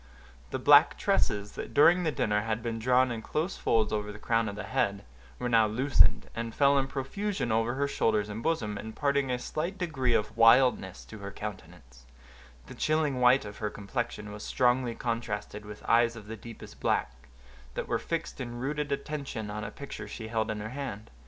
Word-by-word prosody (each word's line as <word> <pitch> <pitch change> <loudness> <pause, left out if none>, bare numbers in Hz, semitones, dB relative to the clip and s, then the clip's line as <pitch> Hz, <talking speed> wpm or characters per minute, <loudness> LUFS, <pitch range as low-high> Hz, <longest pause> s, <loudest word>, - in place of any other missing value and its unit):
The - - -2
black - - +6
tresses, 100 0 0
that - - -7
during 170 +5 +6
the 160 - +1
dinner 105 -7 +1
had 110 +1 -2
been 115 -1 -3
drawn 125 +2 +3
in 115 -1 -4
close 160 +10 -2
folds 110 -2 +1
over 105 -1 -2
the 105 - -9
crown 115 +1 +1
of 100 - -6
the 105 - -5
head, 100 -5 -1 0.3
were 125 - -2
now 115 -2 +4
loosened, 130 +6 +3
and 115 0 -5
fell 140 0 +5
in 135 - -1
profusion 140 - -3
over 115 +2 +1
her 140 +1 0
shoulders 110 -6 +1
and 105 +2 -6
bosom, 110 -10 -1
imparting 140 +5 -1
a 125 - 0
slight 165 +9 -4
degree 135 -9 0
of 105 +1 -1
wildness 115 -4 +4
to 110 - -11
her 100 0 -6
countenance; 85 - -9 0.6
the - - -10
chilling 155 -4 0
white 125 0 +5
of 105 0 -8
her 105 - -1
complexion 105 0 -4
was 105 0 -8
strongly 125 -1 +1
contrasted 110 -3 -4
with 105 0 -10
eyes 115 0 +4
of 110 -3 -10
the 110 +2 -6
deepest 115 +1 -11
black, - - 0 0.6
that - - -3
were - - 0
fixed 165 -4 -4
in 120 -1 -5
rooted 145 +3 -2
attention 140 -6 -4
on 105 +1 -4
a - - -4
picture 140 -7 -8
she 110 +1 -7
held 110 -1 -1
in 105 -1 -3
her 110 - -5
hand. 125 -5 -6
115 Hz, 195 wpm, -29 LUFS, 105-135 Hz, 0.6 s, black